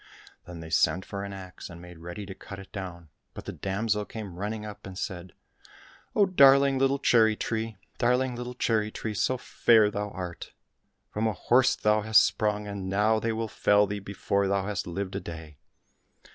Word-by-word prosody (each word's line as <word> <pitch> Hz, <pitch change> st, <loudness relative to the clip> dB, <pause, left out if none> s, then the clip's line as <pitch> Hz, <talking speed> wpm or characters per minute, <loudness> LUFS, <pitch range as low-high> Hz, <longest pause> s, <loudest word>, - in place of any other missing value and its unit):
Then 85 Hz, -1 st, -8 dB
they 80 Hz, 0 st, -9 dB
sent 80 Hz, +3 st, +2 dB
for 100 Hz, 0 st, -5 dB
an 100 Hz, -, -6 dB
axe 95 Hz, -2 st, -9 dB
and 85 Hz, -1 st, -10 dB
made 90 Hz, -1 st, -12 dB
ready 85 Hz, +5 st, -7 dB
to 95 Hz, -, -7 dB
cut 100 Hz, +1 st, -10 dB
it 95 Hz, 0 st, -12 dB
down, 90 Hz, -5 st, -7 dB, 0.3 s
but -, -, -8 dB
the -, -, -4 dB
damsel 105 Hz, +2 st, -1 dB
came 105 Hz, -3 st, -7 dB
running 105 Hz, +1 st, -3 dB
up, 105 Hz, -2 st, -9 dB
and 95 Hz, -1 st, -9 dB
said, 90 Hz, -2 st, -5 dB, 0.4 s
" -, -, -24 dB
Oh, 205 Hz, -, +5 dB
darling 140 Hz, -6 st, +6 dB
little 135 Hz, +1 st, +3 dB
cherry 110 Hz, -5 st, +4 dB
tree, 110 Hz, -1 st, -3 dB, 0.2 s
darling 125 Hz, +1 st, +2 dB
little 125 Hz, +1 st, -6 dB
cherry 110 Hz, -3 st, +1 dB
tree, 110 Hz, 0 st, -5 dB
so 120 Hz, +5 st, +1 dB
fair 110 Hz, -3 st, +4 dB
thou 105 Hz, 0 st, -3 dB
art! 90 Hz, -2 st, -7 dB, 0.6 s
From 110 Hz, +2 st, 0 dB
a 110 Hz, -, 0 dB
horse 125 Hz, +7 st, +3 dB
hast -, -, -25 dB
thou 105 Hz, +1 st, +2 dB
sprung, 105 Hz, -1 st, +4 dB
and 100 Hz, -2 st, -5 dB
now 105 Hz, +3 st, +2 dB
they 115 Hz, +1 st, -1 dB
will 110 Hz, 0 st, -2 dB
fell 105 Hz, -1 st, +3 dB
thee 100 Hz, +1 st, -4 dB
before 100 Hz, 0 st, -1 dB
thou 100 Hz, 0 st, 0 dB
hast 105 Hz, -2 st, -3 dB
lived 95 Hz, +2 st, -4 dB
a 100 Hz, -, -2 dB
day 80 Hz, -4 st, -9 dB
105 Hz, 195 wpm, -28 LUFS, 95-110 Hz, 0.6 s, darling